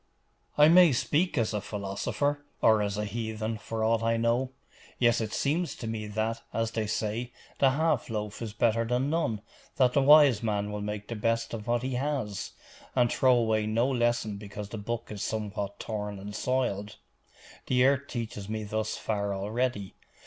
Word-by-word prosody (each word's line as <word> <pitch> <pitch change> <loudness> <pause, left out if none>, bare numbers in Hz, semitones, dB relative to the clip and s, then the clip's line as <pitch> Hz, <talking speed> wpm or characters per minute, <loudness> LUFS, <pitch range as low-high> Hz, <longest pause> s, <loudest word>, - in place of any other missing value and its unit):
'I 150 +1 +7
may 175 -1 +7
speak 155 +8 +1
as 115 -2 +1
a 105 - -1
philosopher, 105 +9 -2 0.2
or 110 -1 +5
as 100 -1 -1
a 105 - -1
heathen, 110 0 -3
for 110 +1 -3
aught 115 0 +2
I 115 0 +1
know: 120 +3 +1 0.5
yet 120 -2 +3
it 110 -1 -3
seems 160 +9 0
to - - -7
me 110 -1 -3
that, 110 +2 -2
as 115 0 -1
they 110 -2 -2
say, 110 +3 -2 0.3
the 135 - +6
half 150 -1 +1
loaf 105 -1 -4
is 115 -2 -4
better 115 +1 +2
than 125 +5 0
none; 115 -11 0 0.3
that 125 -2 +3
the 140 - +4
wise 145 -5 +7
man 105 -2 -1
will 105 0 -4
make 105 0 -4
the 115 - -4
best 115 +2 -1
of 110 0 -6
what 120 0 +1
he 130 0 -2
has, 125 -7 -2 0.4
and 120 -2 +3
throw 130 -1 +4
away 110 -2 +1
no 115 +3 +2
lesson 120 -5 0
because 100 0 -7
the 110 - -6
book 115 +3 -4
is 105 -2 -6
somewhat 105 -2 -3
torn 105 -2 -4
and 100 +1 -8
soiled. 115 -6 -1 0.7
The 125 0 +4
earth 140 +1 +2
teaches 110 -4 -5
me 110 0 -3
thus 110 +1 -2
far 100 -2 -2
already. 105 0 -2
115 Hz, 185 wpm, -28 LUFS, 105-125 Hz, 0.7 s, I